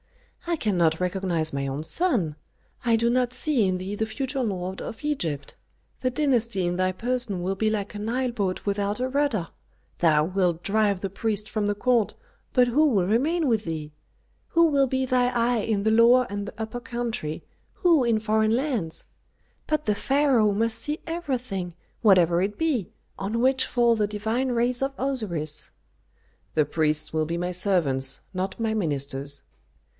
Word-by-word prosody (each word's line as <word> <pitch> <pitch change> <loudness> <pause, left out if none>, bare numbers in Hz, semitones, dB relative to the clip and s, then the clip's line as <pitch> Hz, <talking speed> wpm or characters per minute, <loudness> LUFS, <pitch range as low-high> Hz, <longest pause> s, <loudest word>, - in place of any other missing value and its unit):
"I 340 - +1
cannot 175 - +1
recognize 180 -4 0
my 140 0 -2
own 135 +3 -3
son. 205 - +1 0.5
I 235 -2 +3
do 230 +1 +1
not 250 0 +1
see 255 -8 +2
in 185 -1 0
thee 185 +2 -5
the 220 +1 -1
future 265 +4 -3
lord 190 -4 -3
of 225 - -7
Egypt. 165 - -2 0.4
The 255 - 0
dynasty 240 -8 +1
in 175 0 0
thy 185 +1 +1
person 235 -2 -2
will 190 +2 0
be 215 +3 0
like 210 -2 -2
a 205 - -6
Nile 245 +4 -1
boat 200 -6 -2
without 205 +1 -1
a 255 - 0
rudder. 260 -10 0 0.5
Thou 155 -3 +4
wilt 180 -2 0
drive 205 -1 +1
the 195 - -2
priests 210 0 -2
from 215 -2 -1
the 205 - 0
court, 230 -2 +1 0.4
but 250 -1 +4
who 295 +6 +4
will 200 -10 +2
remain 290 - +1
with 225 -4 +1
thee? 155 -2 -4 0.6
Who 335 0 +4
will 280 -4 +3
be 260 +1 0
thy 250 -1 +2
eye 240 -1 +1
in 205 -2 -1
the 220 - +2
Lower 235 +3 +6
and 205 0 -4
the - - -7
Upper 225 +2 -4
Country, 235 -11 -4 0.3
who 335 -6 +4
in 230 -2 +2
foreign 220 +1 +2
lands? 240 - -2 0.6
But 305 -1 0
the 210 - +1
pharaoh 265 -4 +3
must 225 +2 +1
see 300 +1 -2
everything, 250 - -3 0.3
whatever 180 -6 +5
it 200 +2 -2
be, 295 - 0 0.3
on 205 +4 -2
which 260 +1 +3
fall 235 -1 +3
the 210 -2 +1
divine 220 +5 -1
rays 240 +1 +1
of 270 0 -1
Osiris." 185 - -1 0.8
"The 155 - +3
priests 155 0 -1
will 155 -1 0
be 170 +1 -2
my 180 +1 -2
servants, 150 -8 +1
not 190 +3 -3
my 225 -1 0
ministers." 140 -6 -2
215 Hz, 175 wpm, -25 LUFS, 180-250 Hz, 0.8 s, Lower